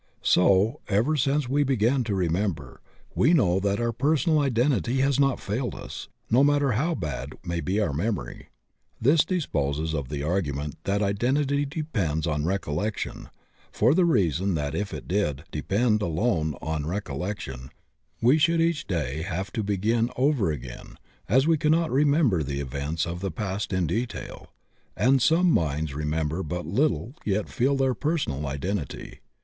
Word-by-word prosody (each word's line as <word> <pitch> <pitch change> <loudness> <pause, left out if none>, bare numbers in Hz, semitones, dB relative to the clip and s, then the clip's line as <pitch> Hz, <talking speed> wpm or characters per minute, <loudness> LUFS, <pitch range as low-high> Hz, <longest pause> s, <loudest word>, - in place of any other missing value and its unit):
So, 100 +8 +3
ever 110 +10 +2
since 140 0 +1
we 140 +3 +1
began 130 -1 +2
to 105 -3 -1
remember, 85 -5 -2 0.3
we 155 +7 +3
know 90 - +3
that 100 +1 0
our 120 0 0
personal 150 +5 +2
identity 130 - +1
has 135 0 +2
not 135 -2 +2
failed 120 +5 -3
us, - - -8 0.2
no 125 +4 +5
matter 145 -2 +3
how 155 +10 0
bad 75 - -4
may 85 -1 -2
be 95 +5 -1
our 90 -9 0
memory. 90 - -3 0.5
This 145 +7 +4
disposes 80 - -1
of 70 -5 -3
the 70 -1 -3
argu 80 -2 -1
ment 75 +1 -5
that 100 +1 +1
identity 135 +8 +1
depends 105 - -2
on 75 -2 -1
recollection, 95 +2 -3 0.4
for 120 +6 +3
the 185 +2 +4
reason 95 - +1
that 75 -2 -2
if 105 0 -2
it - - -7
did 75 -7 -1
depend 105 +8 +1
alone 80 - 0
on 80 -2 -2
recollection 75 -7 -4 0.5
we 130 +7 +5
should 165 +2 +3
each 165 -2 +1
day 75 -5 -2
have 95 +2 -4
to 110 - -1
begin 110 +4 +1
over 130 - +2
again, 65 -5 -8 0.3
as 130 +6 +4
we 165 0 +3
cannot 160 +2 +2
remember 140 - +3
the 70 -1 -3
events 70 +4 -2
of 85 0 -5
the 95 +1 -2
past 95 +4 -3
in 95 -2 +1
detail, 110 +8 -4 0.5
and 130 +5 +3
some 170 +6 +4
minds 75 - 0
remember 75 +3 -2
but 90 +1 -4
little 125 - 0
yet 105 0 -1
feel 135 +3 +1
their 135 -1 +2
personal 125 - -2
identity. 75 +4 -4
100 Hz, 160 wpm, -26 LUFS, -, 0.5 s, no